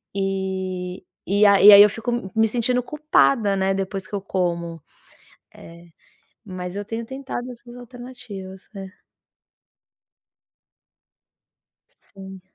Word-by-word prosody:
e 190 -1 -3 0.2
e 205 +2 +3
a 200 -1 +5
e 205 +1 +10
aí 200 - +11
eu 210 - +5
fico 225 +3 -5
m 240 -5 -3
me 225 0 +3
sentindo 245 +2 0
culpada, 275 -7 +2
né, 190 0 +1
depois 195 0 -4
que - - -6
eu 200 - -3
como. 170 -3 -3 0.7
Eh, 170 +1 -14 0.6
mas 180 -3 -7
eu 205 - -4
tenho 225 +2 -5
tentado 265 -1 -6
essas 240 0 -13
alternativas. 245 -6 -10
É. 195 -1 -10 3.0
Sim. 190 -1 -13
200 Hz, 120 wpm, -22 LUFS, 190-235 Hz, 3.0 s, aí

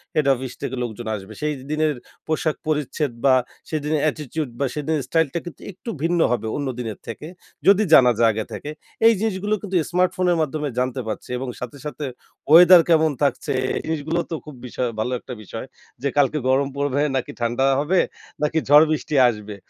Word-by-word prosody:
Head 150 -3 +2
office 130 -1 -5
থেকে 130 - -3
লোকজন 115 0 -6
আসবে। 100 +2 -9
সেইদিনের 150 +1 -1 0.3
পোশাক 155 0 0
পরিচ্ছেদ 150 -2 -1
বা 130 -1 +6 0.3
সেদিনের 150 -1 -1
attitude 150 -2 -5
বা 140 - +1
সেদিনের 150 -1 -1
স্টাইলটা 165 +1 +1
কিন্তু 175 - -9
একটু 195 +6 -10
ভিন্ন 170 +1 +1
হবে 115 -2 -1
অন্য 140 -2 -2
দিনের 110 -4 -5
থেকে 115 +7 -7 0.4
যদি 200 +2 +6
জানা 125 -2 +8
যায় 115 -1 +5
আগে 110 0 -3
থেকে। 145 +8 -6 0.4
এই 230 - +7
জিনিসগুলো 210 -1 -1
কিন্তু 195 -2 -5 0.2
স্মার্টফোনের 180 -1 +2
মাধ্যমে 150 -1 -2
জানতে 130 0 -1
পারছি 110 - -5
এবং 130 +1 -4
সাথে, 125 +3 -7
সাথে 150 0 -5 0.5
ওয়েদার 175 +1 +9
কেমন 160 -2 +4
থাকছে 140 0 0 0.2
এই - - -1
জিনিসগুলো 160 +1 -1
তো - - -1
খুব 150 -3 -10
বিষয়, 125 0 -2
ভালো 125 +3 -1
একটা 125 - -9
বিষয়। 110 +5 -7 0.4
যে 140 - 0
কালকে 145 +2 +3
গরম 135 +1 +3
পড়বে? 140 0 0
নাকি 130 - -2
ঠান্ডা 120 +3 +1
হবে? 175 +5 +2 0.4
নাকি 150 +2 +1
ঝড় 150 +2 +8
বৃষ্টি 155 -1 -2
আসবে? 105 -3 -4
145 Hz, 175 wpm, -22 LUFS, 130-160 Hz, 0.5 s, ওয়েদার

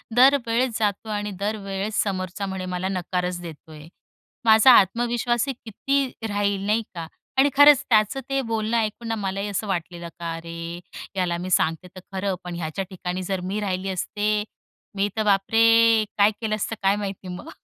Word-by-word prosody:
दरवेळेस 250 -2 +4
जातो 215 +1 -1
आणि 210 0 -2
दरवेळेस 200 0 -2
समोरचा 190 0 -3
म्हणे 190 -1 -4
मला 180 +1 -2
नकारच 180 -1 -2
देतोय. 155 -2 -11 0.6
माझा 220 +3 +7
आत्मविश्वासही 240 +5 +2
किती 275 +5 -1 0.2
राहील, 205 -1 0
नाही 220 +2 +1
का? 165 -1 -5 0.3
आणि 280 +2 +5
खरंच 290 -2 +8
त्याचं 215 +3 +3
ते 275 0 +1
बोलणं 225 -1 -1
ऐकून 225 +1 -2
ना 225 - -1
मलाही 195 -1 -3
असं 205 +1 -3
वाटलेलं, 175 -2 -4
का 170 -1 -3
अरे! 165 +1 -7 0.4
याला 175 -2 0
मी 180 +2 -5
सांगते 165 +1 +1
तर 185 - -8
खरं, 190 0 -1
पण 180 -1 -6
ह्याच्या 170 +2 -3
ठिकाणी 185 -1 -4
जर 190 +1 -2
मी 210 - -1
राहिली 190 -1 -2
असते, 210 +3 -1 0.5
मी 200 +1 +1
तर 220 - +2
बापरे! 225 +2 +4
काय 205 +1 +5
केलं 215 -1 0
असतं 215 +1 -3
काय 195 +1 +4
माहिती 195 -2 -5
मग? 180 0 -7
200 Hz, 165 wpm, -24 LUFS, 185-225 Hz, 0.6 s, खरंच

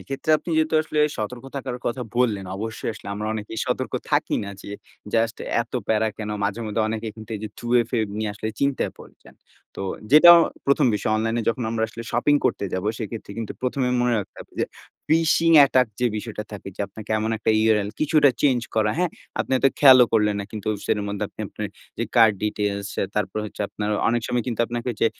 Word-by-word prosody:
এক্ষেত্রে 135 +3 -4
আপনি 175 - -7
যেহেতু 160 0 +1
আসলে 155 -1 -4 0.2
সতর্ক 120 +4 -5
থাকার 130 -2 -4
কথা 120 +2 -2
বললেন, 110 -6 +1
অবশ্যই 110 +2 -4
আসলে 115 - -10
আমরা 105 +1 -4
অনেকেই 110 +1 -5
সতর্ক - - -2 0.2
থাকি - - +1
না, 100 - -6
যে - - -9 0.4
জাস্ট 115 0 +1 0.3
এত 115 - -20 0.2
প্যারা 110 0 +2
কেনো 105 -1 -4
মাঝে 100 +3 -2
মধ্যে 110 +1 0
অনেকে 110 0 -3
কিন্তু 110 0 -11
এইযে 105 +1 -6
2FA 120 0 +1 0.2
নিয়ে 110 -1 -1
আসলে 105 +1 -4
চিন্তায় 140 -1 0
পড়ে - - -14
যান। - - -16 0.4
তো - - -4 0.3
যেটা 155 +3 +10 0.4
১ম 140 0 +4
বিষয় 105 +1 -1
অনলাইনে 115 +1 0
যখন 120 +1 -1
আমরা 115 -1 -1
আসলে 115 +1 -8
শপিং 135 +5 +3
করতে - - -1
যাবো, 95 +3 -1
সেক্ষেত্রে 110 -2 -6
কিন্তু 115 -2 -4
১ম 130 +2 -1
এ - - 0
মনে 125 0 +2
রাখতে 100 - -7
হবে - - -13
যে - - +3 0.4
ফিশিং 165 +1 +3
অ্যাটাক 130 -3 +6
যে 125 - +3
বিষয়টা 105 0 -5
থাকে, 100 -1 -7
যে - - -7
আপনাকে 110 +2 -11
এমন 110 +1 -1
একটা 110 - +1
URL 105 -2 +2
কিছুটা 155 -2 +4
চেঞ্জ 130 -4 +3
করা 110 -1 +2
হ্যাঁ? 180 -1 +1 0.3
আপনি - - -4
হয়তো 135 +1 +4
খেয়ালও 130 -4 +8
করলেন 105 -2 +3
না - - -4
কিন্তু 110 -1 -5 0.2
সেটার 105 -2 0
মধ্যে 100 0 -2
আপনি - - -12
আপনার - - -5 0.3
যে - - 0
কার্ড 110 -2 +6
ডিটেইলস 100 -1 -2 0.3
তারপর 105 0 -1
হচ্ছে, 105 - -9
আপনার 105 0 -3 0.2
অনেক 120 0 +1
সময় 120 -2 -1
কিন্তু 120 -2 -2
আপনাকে 120 +1 -5
ওইযে 115 - +1
115 Hz, 200 wpm, -23 LUFS, 105-125 Hz, 0.4 s, যেটা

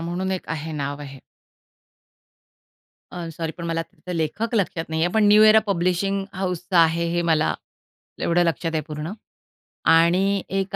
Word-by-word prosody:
म्हणून 175 +3 -3
एक 185 - -4
आहे 160 0 -4
नाव 145 -1 -4
आहे. 135 -1 -9 1.9
अ, 175 -2 -6
सॉरी 160 0 -5
पण 170 - -6
मला 165 0 -1
आता 180 +2 -9
लेखक 205 +9 -2
लक्षात 175 -5 -1
नाहीये, 160 +2 +1
पण 220 -1 +4
न्यू 210 +1 +7
इरा 215 0 +7
पब्लिशिंग 195 +1 0
हाउसचं 180 -1 -2
आहे 165 0 +4
हे 175 - +1
मला 155 0 +1 0.7
एवढं 175 +1 +2
लक्षात 165 0 -1
आहे 155 - +1
पूर्ण. 150 +4 -5 0.7
आणि 180 +4 +4
एक 195 0 -2
170 Hz, 150 wpm, -23 LUFS, 160-190 Hz, 1.9 s, न्यू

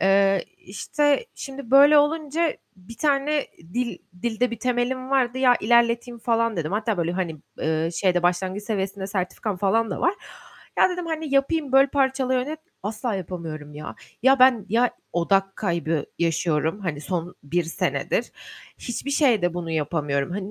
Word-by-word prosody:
Eee, 195 0 +3
işte 290 - 0
şimdi 270 -3 -8
böyle 285 +2 +8
olunca 310 +2 +1 0.2
1 190 +5 -13
tane 290 0 +1 0.3
dil 245 -1 -2 0.2
dilde 240 +1 0
bir 235 - -5
temelim 255 +2 -1
vardı. 260 -2 +1
Ya 250 -2 +5
ilerleteyim 235 +1 +2
falan 230 -2 0
dedim. 165 +2 -2
Hatta 210 0 0
böyle, 170 0 0
hani, 175 -4 -2 0.2
eee, 160 +1 0
şeyde 180 -2 +1
başlangıç 185 +3 0
seviyesinde 195 -2 -3
sertifikam 195 +1 -3
falan 215 +3 +1
da - - -4
var. 350 +4 +2 0.6
Ya, - - +6
dedim, 355 -1 -4
hani, 315 -3 -3
yapayım, 275 0 +1
böl 270 +1 +6
parçala, 265 -2 +1
yönet 285 +5 -2 0.2
asla 215 +3 -3
yapamıyorum 165 -5 -6
ya. 150 +1 -7 0.3
Ya 265 +1 +5
ben, 250 -5 +5
ya, 235 +4 +3 0.2
odak 195 +3 +1
kaybı 170 -5 -1
yaşıyorum. 165 +1 0
Hani, 155 -6 -3
son 175 +2 -4
1 170 +4 -1
senedir. 165 - -1 0.5
Hiçbir 250 +3 -5
şeyde 230 - +2
bunu 170 -2 -4
yapamıyorum. 150 -2 -1
Hani, 195 +1 -4
220 Hz, 150 wpm, -24 LUFS, 175-265 Hz, 0.6 s, böyle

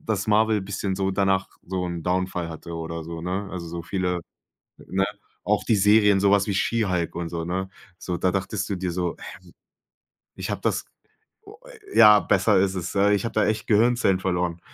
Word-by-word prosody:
dass 105 -1 -2
Marvel 110 0 +3
bisschen 95 0 -3
so 95 0 0
danach 95 -1 +1 0.2
so 90 0 -3
'n 85 -1 -5
Downfall 90 -1 -1
hatte 85 +1 -8
oder 80 0 -5
so, 85 0 -7
ne? 95 +3 -3
Also, 85 -3 -6
so 85 0 -6
viele 90 -1 -2 0.7
ne 95 +1 0 0.4
auch - - 0
die 110 - +2
Serien, 105 0 +5
sowas 100 0 +3
wie 100 - -1
She 115 +2 +1
Hulk 90 -3 -1
und 85 -1 -4
so, 85 -1 -4
ne? 95 +2 -3 0.3
So, 90 - -3
da 90 - +1
dachtest 95 +1 -2
du 100 - -1
dir 90 -1 -3
so: 90 -1 -2
„Hä, - - -10 1.0
ich - - -5
habe - - -4
das - - -1 0.6
"oh, 425 +2 -14
äh, 435 -5 -10
ja, 105 -1 +9
besser 95 +2 +2
ist 95 0 +1
es. 90 -2 -4
Ja, 100 +1 +3
ich 100 - +1
habe 115 - -3
da 110 - +2
echt 105 0 -1
Gehirnzellen 110 -3 +3
verloren, 90 -2 -1
95 Hz, 200 wpm, -24 LUFS, 90-105 Hz, 1.0 s, ja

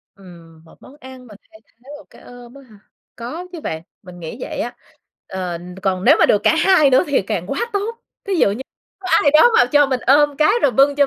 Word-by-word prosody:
Ừm, 170 -4 -17
một 160 - -21
món 275 - -16
ăn 260 -1 -13
mà 210 - -14
thay 220 - -19
thế 245 +4 -23
một 305 - -17
cái - - -19
ôm 245 0 -14
á 275 - -14
hả? 215 -6 -19 0.4
Có 305 +10 -7
chứ 335 -3 -9
bạn, 160 0 -5 0.2
mình 180 -1 -13
nghĩ 165 +7 -8
vậy - - -6
á. 240 - -4 0.5
Ờ, 180 -2 -5 0.2
còn 185 -1 -2
nếu - - +6
mà - - +5
được 205 - +2
cả - - +3
hai 335 -4 +4
nữa 260 - +3
thì 280 - +1
càng 180 -2 -4
quá 285 - -3
tốt. 445 +4 -3 0.3
Thí 395 - -1
dụ 200 -11 +2
như 230 +6 -6 0.4
có 370 - -7
ai 285 - +3
đó 310 +11 +5
mà 245 - +5
cho 290 -1 +5
mình 260 -2 -2
ôm 290 +1 +3
cái, 310 +6 +3
rồi 275 - +3
bưng 275 +2 +3
cho 285 -1 +3
260 Hz, 245 wpm, -18 LUFS, 195-290 Hz, 0.5 s, nếu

